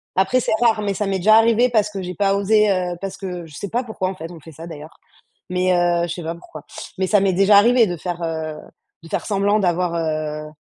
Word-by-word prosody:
Après, 190 +7 +2
c'est 245 - -1
rare, 225 -3 +3
mais 200 -1 -1
ça 210 - -2
m'est 190 -1 -1
déjà 215 +4 +5
arrivé 230 +2 +4
parce 215 -3 +1
que 200 -2 -6
j'ai 180 0 -6
pas 195 +1 +1
osé, 210 +1 +3
heu, 180 -2 -1
parce 195 0 -5
que 180 -3 -6
je 155 - -15
sais 195 +7 -6
pas 245 +2 -1
pourquoi 210 -5 -3
en 195 - -6
fait, 165 -1 -8
on 170 - -11
fait 160 +2 -13
ça 160 +3 -10
d'ailleurs 155 -1 -10 0.5
mais 180 0 +1
heu 175 -1 +1
je 165 - -4
sais 175 -1 -7
pas 165 +1 -3
pourquoi. 155 -3 -12 0.4
Mais 190 - 0
ça 205 +2 +3
m'est 190 -1 +1
déjà 195 +2 +5
arrivé 235 +2 +5
de 175 -3 -3
faire, 175 0 -5
heu, 160 -1 -4 0.5
de 165 - -12
faire - - -3
semblant 205 +1 +1
d'avoir, 175 -2 0
heu 155 -2 -3
185 Hz, 255 wpm, -20 LUFS, 170-205 Hz, 0.5 s, déjà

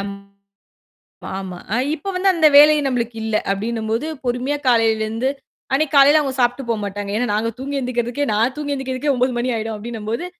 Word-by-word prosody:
அம், 200 0 -5 1.2
ஆமா. 185 -2 -6 0.2
அ - - +2 0.2
இப்ப 385 +1 -1
அந்த 315 -2 +5
வேலை 300 +1 +8
நம்மளுக்கு 235 -3 -2
இல்ல. 220 -1 -1 0.2
அப்பிடின்னம்போது 225 +6 -2 0.2
பொறுமையா 250 +4 -1
காலையில 225 -2 +3
இருந்து 230 +5 -1 0.4
அன்னக்கி 300 +1 +1
காலையில 290 +2 +7 0.2
சாப்பிட்டு 245 +2 +1
போ 230 - +3
மாட்டாங்க. 200 0 -5
ஏன்னா, 245 - 0
நாங்க 220 +2 0
தூங்கி 280 +1 -3
எந்திருக்குறதுக்கே 245 +2 -2
நான் 230 +5 +1
தூங்கி 290 -1 -3
எந்திருக்குறதுக்கே 265 +1 -2
9:00 250 +1 +1
மணி 245 +2 -1
ஆயிடும் 220 0 -3
அப்பிடின்னம்போது, 225 +5 -5
245 Hz, 160 wpm, -20 LUFS, 220-275 Hz, 1.2 s, வேலை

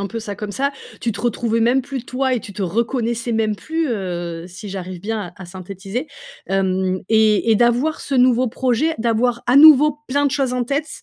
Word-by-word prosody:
un 200 - -2
peu 230 - -5
ça 210 -2 -6
comme 210 0 -6
ça. 275 +7 -1 0.3
Tu 230 - -1
te - - -7
retrouvais 230 0 0
même 245 +4 +3
plus 270 -1 -6
toi 260 +1 -1
et 245 - -2
tu 200 - -10
te 200 - -8
reconnaissais 235 +4 -1
même 220 -1 +1
plus, 320 +8 -3
heu, 175 -6 -4
si 190 +3 -9
j'arrive 185 -2 -6
bien 205 -3 -4
à 190 - -10
à - - -9
synthétiser, 195 - -6 0.4
hem, 190 -1 0
et 220 0 +3
et - - +4
d'avoir 240 +7 +2
ce 275 - -2
nouveau 250 -1 +4
projet, 260 +6 0
d'avoir 235 +1 0
à 245 - +3
nouveau 300 0 +7
plein 285 +2 +1
de 275 - -1
choses 270 -3 0
en 250 -1 -1
tête, 285 +5 -2
230 Hz, 210 wpm, -20 LUFS, 200-255 Hz, 0.4 s, nouveau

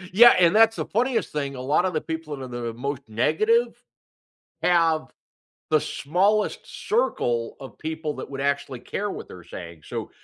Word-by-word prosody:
Yeah, 240 +3 +9
and 175 +3 +5
that's 225 0 +6
the - - -3
funniest 245 +3 0
thing, 140 -2 -3
a 125 - -6
lot 150 +7 +2
of 185 - -1
the 155 - +1
people 160 -2 -5
that 135 - -8
are - - -6
the 120 -1 -4
most 140 +3 -3
negative, 215 - +2 0.9
have 165 -3 +3 0.7
the 155 -1 +4
smallest 195 +11 +1 0.3
circle 120 - 0
of 135 - -10
people 160 -1 -4
that - - -7
would 135 0 -4
actually 140 -3 -1
care 205 +10 -3
what - - -7
they're 90 -2 -11
saying, 85 -3 -9
so, - - -5
155 Hz, 175 wpm, -24 LUFS, 130-200 Hz, 0.9 s, Yeah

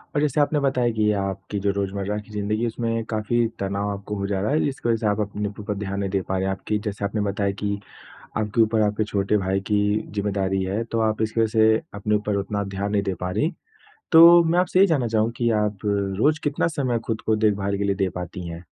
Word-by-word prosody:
और 145 - +2
जैसे 150 0 +1
आपने 145 +1 +2
बताया 130 -3 +1
कि 105 -1 +2
आपकी 95 +1 -4
जो 100 0 +1
रोज़मर्रा 100 +1 -2
की 105 0 -9
ज़िंदगी 105 +1 -2
है 120 - +1
उसमें 115 0 -2
काफ़ी 115 +2 +1
तनाव 100 +1 -2
आपको 100 +1 -5
हो 100 0 -2
जा 95 -2 -1
रहा 105 - 0
है 155 - +2
जिसकी 135 -4 -2
वजह 115 - +3
से 110 -1 -1
आप 105 +1 +1
अपने 105 0 -2
ऊपर 105 0 -5
ध्यान 100 -1 -3
नहीं 100 -1 -1
दे 95 0 0
पा 95 +1 -3
रहे 95 - -1
हैं 95 - 0
आप 95 - -5
कि 105 - +1
जैसे 105 0 -3
आपने 105 +1 -2
बताया 100 0 -1
कि 100 0 -1 0.6
आपके 110 +1 0
ऊपर 110 0 +2
आपके 105 +1 0
छोटे 100 +1 +1
भाई 95 +1 0
की 105 - +3 0.4
ज़िम्मेदारी 95 -2 -1
है 100 +4 -1
तो 115 - 0
आप 110 - -3
इसकी 110 +1 0
वजह 110 - +3
से 110 0 +4
अपने 100 +1 -1
ऊपर 105 0 -1
उतना 100 +1 -3
ध्यान 100 +1 -2
नहीं 100 -1 +2
दे 95 -2 -2
पा 90 - -2
रही 145 - 0 0.6
तो 170 +1 +9
मैं 170 +2 +2
आपसे 185 0 +2
यही 195 - +7
जानना 140 -8 +1
चाहूँगा 110 +1 +1
कि 120 -1 +1
आप 105 -1 -1
रोज़ 100 +9 +1
कितना 145 +2 +1
समय 125 -4 0
ख़ुद 110 -1 -2
को 110 - +3
देखभाल 100 -2 +1
के 100 - -1
लिए 100 -1 +1
दे 95 -1 0
पाती 90 0 -6
हैं? 85 +1 -7
105 Hz, 245 wpm, -23 LUFS, 100-115 Hz, 0.6 s, तो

